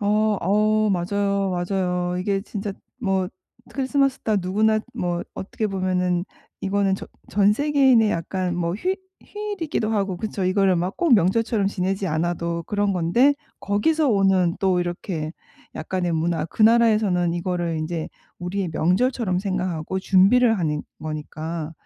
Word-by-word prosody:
어 205 - -2 0.3
어. 215 +3 +2
맞아요, 200 +2 0
맞아요. 180 -1 -1
이게 195 +1 0
진짜 205 0 -5 0.3
뭐 190 -4 0 0.4
크리스마스 275 0 +1
다 215 -2 0
누구나 215 +4 +2
뭐 175 -1 -2
어떻게 215 +3 -3
보면은 180 -2 0 0.4
이거는 195 0 +1
전 - - -9 0.2
전 205 0 +4
세계인의 265 -4 +4
약간 180 +1 -2
뭐 170 0 -1
휴 365 - -1 0.3
휴일이기도 400 - -3
하고 195 -4 -1
그쵸? 210 -2 -3
이거를 185 0 +3
막 180 +3 -2
꼭 335 -8 +5
명절처럼 210 +2 +2
지내지 190 0 -2
않아도 170 +1 -1
그런 205 -1 0
건데 210 +12 +3 0.3
거기서 290 +10 +1
오는 195 -5 +3
또 190 -3 +2
이렇게 175 -2 -4 0.4
약간의 175 +1 -2
문화. 165 +1 0
그 190 +6 -2
나라에서는 215 -6 +4
이거를 175 -2 -2
인제 155 +1 -3 0.3
우리의 180 +1 -3
명절처럼 185 +3 +1
생각하고 185 -2 -2
준비를 210 +5 +4
하는 150 -4 -1 0.2
거니까 155 +1 -5
190 Hz, 315 characters per minute, -23 LUFS, 175-215 Hz, 0.4 s, 꼭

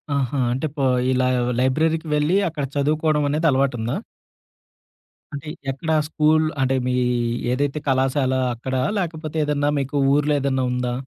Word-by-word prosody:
ఆహా! 135 0 -1
అంటే 135 +5 -2
పో 135 - +1 0.3
ఇలా 130 0 +2 0.3
లైబ్రరీకి 160 +5 +1
వెళ్ళి 150 +5 +2
అక్కడ 150 -3 -3
చదువుకోవడం 150 +1 +1
అనేది 155 +3 +1
అలవాటుందా? 130 -4 0 1.4
అంటే, 145 +2 -6 0.2
ఎక్కడ 160 +4 -4 0.2
స్కూలు 155 0 +2
అంటే 135 0 +2
మీ 125 - 0 0.6
ఏదైతే 140 +3 -1
కళాశాల 130 0 +1 0.2
అక్కడా? 130 +2 -2 0.2
లేకపోతే 160 -4 -3
ఏదన్నా 145 0 0
మీకు 140 +1 -4 0.2
ఊర్లో 150 +1 +2
ఏదన్నా 135 -1 0
ఉందా? 125 -1 -1
140 Hz, 130 wpm, -22 LUFS, 130-155 Hz, 1.4 s, ఇలా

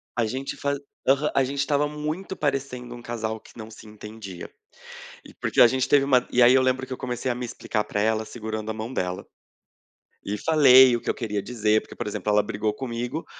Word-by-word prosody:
A 120 -2 +1
gente 130 +5 -4
fa 140 0 -2 0.6
a 135 - +4
gente 140 +2 -4
estava 145 +1 +1
muito 155 +6 -4
parecendo 135 -4 -3
um 120 - -10
casal 110 -2 -4
que - - -18
não 110 0 -8
se 110 - -13
entendia. 105 -3 -9 0.8
E - - -14
porque - - -1
a 120 - +10
gente 130 +1 0
teve 140 -1 +4
uma 130 -3 +3
e 125 - +3
aí 120 +1 +7
eu 130 - +5
lembro 130 0 0
que - - -9
eu - - -5
comecei 125 0 -3
a - - 0
me 125 0 -4
explicar 110 -2 -3
pra 105 - -3
ela, 110 +1 +1
segurando 110 -1 -5
a - - -3
mão 110 +3 -6
dela. 90 -5 -3 1.0
E 105 +1 -3
falei 130 -5 +6
o 120 - -3
que - - -5
eu - - 0
queria 105 -4 -3
dizer, 110 -2 +1
porque, - - -13
por 120 - -5
exemplo, 105 0 -2
ela 105 0 +4
brigou 105 +1 -2
comigo 125 +4 -4
120 Hz, 220 wpm, -25 LUFS, 110-130 Hz, 1.0 s, a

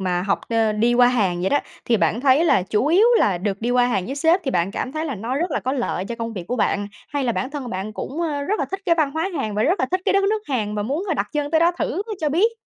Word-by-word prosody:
mà 180 -1 0
học, 195 0 0
ờ 225 -2 +2
đi 235 +3 +2
qua 245 0 +6
Hàn 195 -8 +1
vậy 190 - 0
đó, 285 - +4 0.3
thì 230 - +2
bạn 220 +3 +1
thấy 280 +4 +4
là 195 - +3
chủ 210 +7 0
yếu 375 +9 +5
là 185 -4 +2
được 200 +1 -3
đi 240 +2 -1
qua 245 0 +3
Hàn 195 -6 -1
với 270 - -4
sếp 325 +5 +3
thì 265 - 0
bạn 175 -3 0
cảm 260 +6 -4
thấy 310 +1 -3
là 280 -5 -3
nó 230 +6 -3
rất 345 +4 -1
là - - -1
có 260 - -2
lợi 240 -8 -2
cho 235 - -5
công 230 0 -5
việc 185 -5 -6
của 250 - -1
bạn, 205 -2 0 0.2
hay 285 -2 -2
là 235 - +1
bản 260 +4 -3
thân 285 -3 -5
của 240 - -6
bạn 195 +3 -4
cũng, 295 +9 -5
ơ, 295 -4 -1
rất 415 +9 -1
là - - +1
thích 385 0 -4
cái 335 - +4
văn 305 -4 +1
hóa 325 +6 -2
Hàn 215 -6 -2
và 210 - +1
rất 350 - +2
là 260 - +2
thích 370 +1 0
cái - - +2
đất 395 0 +3
nước 430 +2 +1
Hàn 215 -6 -1
và 210 - -1
muốn 285 - -2
đặt - - -1
chân 295 -1 -2
tới 320 0 +3
đó 340 +1 +4
thử 390 - -1 0.2
cho 305 - +1
biết? 395 +10 +2
255 Hz, 320 wpm, -22 LUFS, 210-315 Hz, 0.3 s, qua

